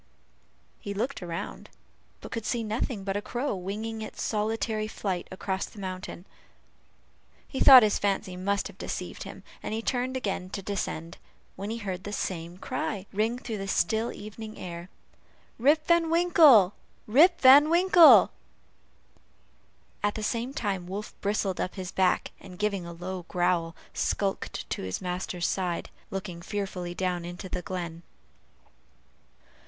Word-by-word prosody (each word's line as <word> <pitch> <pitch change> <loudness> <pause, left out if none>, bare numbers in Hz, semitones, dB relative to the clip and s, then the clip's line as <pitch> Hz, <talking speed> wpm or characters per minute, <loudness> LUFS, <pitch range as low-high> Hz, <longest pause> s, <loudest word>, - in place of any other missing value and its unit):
He 200 -1 -5
looked 250 +5 -2
around, 170 -1 -6 0.5
but - - -9
could 230 - -3
see 235 +1 -1
nothing 215 -1 -2
but 195 0 -2
a 205 - -1
crow 245 +3 -2
winging 215 +4 -4
its 215 - -6
solitary 215 0 -1
flight 190 -4 -3
across 190 0 -3
the - - -16
mountain. 185 -1 -6 1.2
He 265 - -5
thought 260 -3 +10
his 210 -1 +2
fancy 195 -2 -1
must 200 +2 -1
have - - -15
deceived - - -5
him, - - -10 0.2
and 220 +1 -4
turned 255 +1 0
again 195 -6 -3
to 195 0 -5
descend, 175 -4 -4 0.4
when 200 +2 -5
he 225 - -3
heard 190 -4 -5
the 205 - -6
same 175 -3 -4
cry 195 +1 -3
ring 220 +4 +1
through 230 -4 -5
the 195 - -4
still 220 +5 +1
evening 215 +1 -9
air, 170 0 -7 0.7
"Rip 300 +5 +4
Van 340 -1 +3
Winkle! 315 - +6 0.3
Rip 325 - +5
Van 280 +3 +8
Winkle!" 345 -1 +7 1.7
at 205 0 0
the 215 - -4
same 235 +3 -1
time 195 -8 -2
Wolf 200 +3 -5
bristled 200 -2 0
up 185 - -3
his 185 -2 -5
back, 185 -1 +1
and 185 -2 -12
giving 200 -4 -1
a - - -6
low 180 +1 -6
growl, 175 -2 0 0.2
skulked 195 -1 -2
to - - -2
his 95 -1 -3
master's 180 -1 -3
side, 180 -3 -2 0.2
looking 190 -3 -5
fearfully 185 -3 -4
down 180 -2 -1
into 175 +2 -7
the 180 -1 -3
glen. 175 -3 -5
200 Hz, 150 wpm, -28 LUFS, 180-225 Hz, 1.7 s, thought